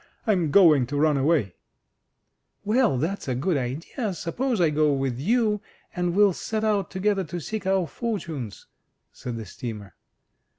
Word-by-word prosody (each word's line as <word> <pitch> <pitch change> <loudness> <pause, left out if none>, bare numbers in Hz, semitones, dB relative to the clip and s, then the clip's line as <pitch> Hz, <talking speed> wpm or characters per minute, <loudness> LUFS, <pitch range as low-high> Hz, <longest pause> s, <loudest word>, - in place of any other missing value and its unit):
I'm 185 -8 +2
going 150 -8 +6
to 145 +3 -3
run 150 0 +3
away! 135 - +1 0.5
" - - -48
"Well, 220 - +3
that's 165 +8 -2
a 130 - 0
good 160 +7 0
idea; 160 - -3
suppose 235 - -2
I 165 -3 +3
go 150 0 +3
with 135 -3 -2
you, 210 - +1 0.3
and 180 -1 -1
we'll 205 -1 +5
set 220 +5 -3
out 210 -3 +1
together 195 +1 0
to 175 +3 -5
seek 205 +4 -5
our 190 -2 +2
fortunes!" 165 - -5 0.5
said 120 -2 -6
the 110 - -6
steamer. 105 -2 -7
170 Hz, 160 wpm, -25 LUFS, 135-205 Hz, 0.5 s, going